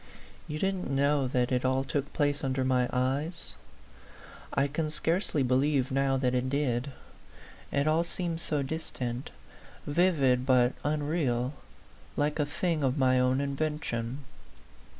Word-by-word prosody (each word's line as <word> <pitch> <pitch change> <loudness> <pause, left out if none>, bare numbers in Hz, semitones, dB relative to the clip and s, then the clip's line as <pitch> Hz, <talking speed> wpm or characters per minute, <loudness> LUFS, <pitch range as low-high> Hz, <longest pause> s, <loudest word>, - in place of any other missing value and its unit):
You 150 - -4
didn't 190 -2 -1
know 140 0 +2
that 125 -1 0
it 125 -1 +1
all 130 +1 +2
took 140 +1 -2
place 145 0 0
under 130 -1 0
my 125 -1 +2
eyes? 140 +7 -1 1.0
I 140 - +2
can 155 +2 -2
scarcely 160 -1 +1
believe 130 +1 +2
now 135 0 +2
that 130 -1 +1
it 125 +1 0
did: 140 -1 0 0.8
it 140 - +1
all 160 +2 +3
seems 170 -1 -2
so 150 -4 0
distant, 130 -4 -4 0.6
vivid 145 -6 +3
but 125 -1 +4
unreal, 145 -4 0 0.6
like 150 +1 0
a 145 - +1
thing 160 0 -1
of 130 +1 +1
my 130 -1 +4
own 125 +1 +2
invention. 140 -3 -2
140 Hz, 135 wpm, -29 LUFS, 130-150 Hz, 1.0 s, but